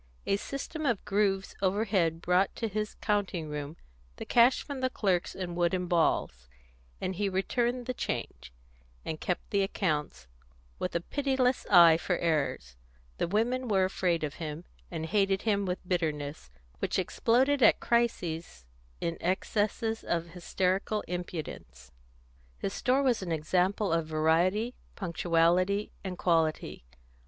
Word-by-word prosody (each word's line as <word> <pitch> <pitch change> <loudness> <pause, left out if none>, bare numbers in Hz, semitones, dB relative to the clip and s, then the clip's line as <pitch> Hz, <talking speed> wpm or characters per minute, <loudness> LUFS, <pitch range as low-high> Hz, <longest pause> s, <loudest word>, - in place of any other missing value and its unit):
A 195 - +2
system 280 +7 -5
of 235 -6 0
grooves 195 -1 +1
overhead 190 -4 +1
brought 180 +2 +2
to 225 - -2
his 215 0 -3
counting 195 -7 -1
room 150 +2 -5 0.4
the - - -7
cash 245 +2 +4
from 285 -2 -6
the 260 - +1
clerks 190 -8 0
in 180 -2 -4
wooden 175 +1 +1
balls, 155 - 0 0.5
and 185 - -2
he 205 0 0
returned 240 +6 0
the 255 - -2
change, 65 - -4 0.5
and 155 -1 -4
kept 180 - -3
the 200 - +2
accounts, 155 - -1 0.5
with 180 - -3
a 170 - +1
pitiless 265 +2 0
eye 170 -4 +8
for 180 +1 -1
errors. 140 - -1 0.4
The - - +1
women 240 +7 0
were 195 -4 +3
afraid 180 -3 0
of 145 -2 -2
him, 155 +2 -5 0.2
and 160 -2 -4
hated 195 +1 +1
him 200 -3 +1
with 180 0 -4
bitterness, 150 - -2 0.3
which - - -1
exploded 265 +4 +2
at - - +6
crises 170 - -1 0.4
in 170 0 -2
excesses 215 +4 -1
of 170 0 -2
hysterical 185 +4 -1
impudence. 170 - -6 0.7
His 195 - -3
store 265 +2 +2
was 250 -5 +2
an 180 -3 -4
example 180 +5 +1
of 165 -1 0
variety, 170 +9 +2 0.2
punctuality, 180 +2 +1
and 185 -2 -5
quality. 160 - 0
185 Hz, 140 wpm, -29 LUFS, 165-210 Hz, 0.7 s, eye